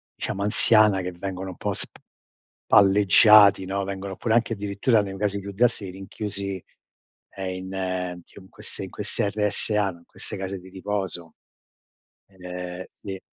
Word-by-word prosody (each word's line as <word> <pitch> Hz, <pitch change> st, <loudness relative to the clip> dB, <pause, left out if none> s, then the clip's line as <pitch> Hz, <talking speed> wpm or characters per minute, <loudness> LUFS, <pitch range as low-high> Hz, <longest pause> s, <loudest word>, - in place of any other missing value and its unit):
diciamo 100 Hz, -, -3 dB
anziana 105 Hz, -1 st, +5 dB
che 90 Hz, 0 st, -4 dB
vengono 95 Hz, +1 st, -5 dB
un 90 Hz, -, -9 dB
po' -, -, -2 dB
spalleggiati, 100 Hz, 0 st, +4 dB
no. 100 Hz, +1 st, -2 dB
Vengono 95 Hz, 0 st, -5 dB
pure 115 Hz, -, 0 dB
anche 120 Hz, -1 st, +2 dB
addirittura 105 Hz, +2 st, +1 dB
nei 95 Hz, -1 st, -6 dB
casi 100 Hz, 0 st, -1 dB
più 100 Hz, +1 st, -7 dB
drastici 105 Hz, -2 st, 0 dB
rinchiusi, 100 Hz, 0 st, -5 dB, 0.7 s
ehm, 95 Hz, -1 st, -4 dB
in 95 Hz, +1 st, -7 dB
ehm, 90 Hz, -2 st, -3 dB, 0.2 s
in 95 Hz, -1 st, -17 dB
queste -, -, -8 dB
in -, -, -7 dB
queste 100 Hz, -, -2 dB
RSA, 105 Hz, 0 st, 0 dB
in 85 Hz, -1 st, -16 dB
queste -, -, -8 dB
case 95 Hz, 0 st, -5 dB
di 90 Hz, +1 st, -14 dB
riposo. 95 Hz, -3 st, -4 dB, 0.9 s
Ed 95 Hz, -2 st, -21 dB
è 90 Hz, 0 st, -6 dB, 0.2 s
sì 95 Hz, -2 st, -6 dB
95 Hz, 150 wpm, -24 LUFS, 95-100 Hz, 0.9 s, anziana